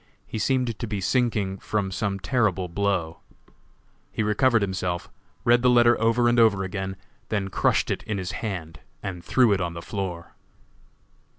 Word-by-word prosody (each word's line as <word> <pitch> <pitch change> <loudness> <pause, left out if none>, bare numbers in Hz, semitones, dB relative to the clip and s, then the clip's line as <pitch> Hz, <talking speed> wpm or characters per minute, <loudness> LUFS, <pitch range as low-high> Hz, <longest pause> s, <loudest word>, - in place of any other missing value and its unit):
He 110 - -5
seemed 125 -3 0
to 120 - -3
be 105 -2 -3
sinking 105 -3 0
from 100 -3 -2
some 100 +1 -2
terrible 95 -4 +1
blow. 90 -3 -1 0.9
He - - -1
recovered 110 +1 +3
himself, 90 -2 -3 0.3
read 120 0 +5
the 125 - +4
letter 120 -1 +6
over 115 +2 +3
and 120 0 +3
over 105 -4 +4
again, 95 0 -4 0.3
then 100 -3 -1
crushed - - +1
it - - -2
in 105 -2 -3
his 95 -1 -3
hand 85 -8 -5 0.2
and 90 -3 -5
threw 125 -5 +4
it 100 - 0
on 85 -1 -3
the - - -5
floor. 95 -5 -5
100 Hz, 165 wpm, -25 LUFS, 95-115 Hz, 0.9 s, letter